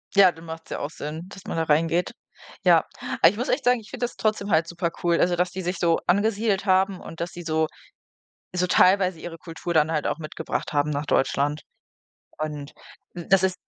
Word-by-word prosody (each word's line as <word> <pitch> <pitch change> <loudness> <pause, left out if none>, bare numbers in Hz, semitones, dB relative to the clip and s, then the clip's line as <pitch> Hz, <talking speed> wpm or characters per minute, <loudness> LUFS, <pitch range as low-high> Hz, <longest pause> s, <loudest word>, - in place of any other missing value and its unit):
Ja, 195 -2 +7
dann 165 0 -14
macht's 165 0 -8
ja - - -4
auch 145 - -3
Sinn, 155 +4 -6
dass 195 0 -12
man - - -4
da 165 - +2
reingeht. 165 +3 +1 0.5
Ja. - - +5 0.4
Aber 165 - +9
ich 195 - -5
muss 245 +4 -3
echt 260 -1 0
sagen, 245 -1 +4
ich 215 - -15
finde 245 -1 -2
das 240 - -7
trotzdem 215 -2 -1
halt 160 -3 +3
super 170 0 -2
cool 170 -1 +3
also, 175 0 +3
dass 180 +1 0
die 190 - -5
sich 180 0 -2
so 170 -1 +2
angesiedelt 205 +1 +2
haben 190 0 +2
und 165 - -10
dass 170 +2 -3
sie 175 - -8
so 160 -1 +1 0.9
so 180 0 +1
teilweise 185 -1 +4
ihre 165 0 -7
Kultur 165 +1 -5
dann 155 0 +3
halt 150 -2 0
auch - - -1
mitgebracht 155 -1 -4
haben 145 0 +1
nach 145 0 -2
Deutschland. 145 +2 +1 0.8
Und 150 -2 -4 0.4
das 185 +2 +2
ist 190 -1 +2
175 Hz, 210 wpm, -25 LUFS, 160-190 Hz, 0.9 s, Aber